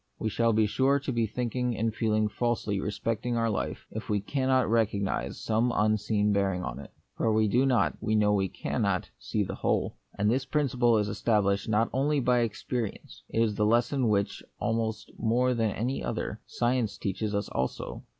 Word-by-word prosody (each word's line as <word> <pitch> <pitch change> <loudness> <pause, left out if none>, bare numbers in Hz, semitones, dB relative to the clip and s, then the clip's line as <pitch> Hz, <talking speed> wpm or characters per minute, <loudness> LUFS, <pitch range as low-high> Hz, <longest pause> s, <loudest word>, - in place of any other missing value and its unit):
We 110 - -1
shall 115 +2 +2
be 110 0 +3
sure 135 +6 +2
to 140 -1 -3
be 115 -2 +1
thinking 125 +1 -2
and 110 0 0
feeling 110 -1 +1
falsely 110 -2 -1
respecting 115 +4 -2
our 115 -1 +1
life, - - -3
if 110 +1 -6
we 105 -1 +2
cannot 130 +3 +1
recognise 105 -3 0
some 115 +2 +1
unseen 105 0 +2
bearing 95 -2 0
of - - -5
it. - - -10 0.3
For 115 - +2
we 110 0 +3
do 125 +6 +3
not, 125 -3 +2
we 110 - +1
know 105 -1 +3
we 95 -2 +2
cannot, - - -1
see - - -1
the - - -4
whole. - - -1 0.2
And 105 +2 +2
this 130 +2 +1
principle 125 -5 +2
is 105 -1 +1
established 100 -2 +1
not 110 +1 +3
only 140 +3 +2
by 125 -1 +3
experience; 115 0 -3
it 115 - +2
is 110 -2 +1
the 105 - 0
lesson 120 +3 +2
which, 100 -1 0 0.2
almost 110 -1 -2
more 125 +3 +2
than 115 -2 +1
any 120 +6 -2
other, - - -3
science 120 -4 0
teaches 105 +2 -2
us 100 0 -1
also. 65 +1 -3
110 Hz, 185 wpm, -28 LUFS, 105-120 Hz, 0.3 s, be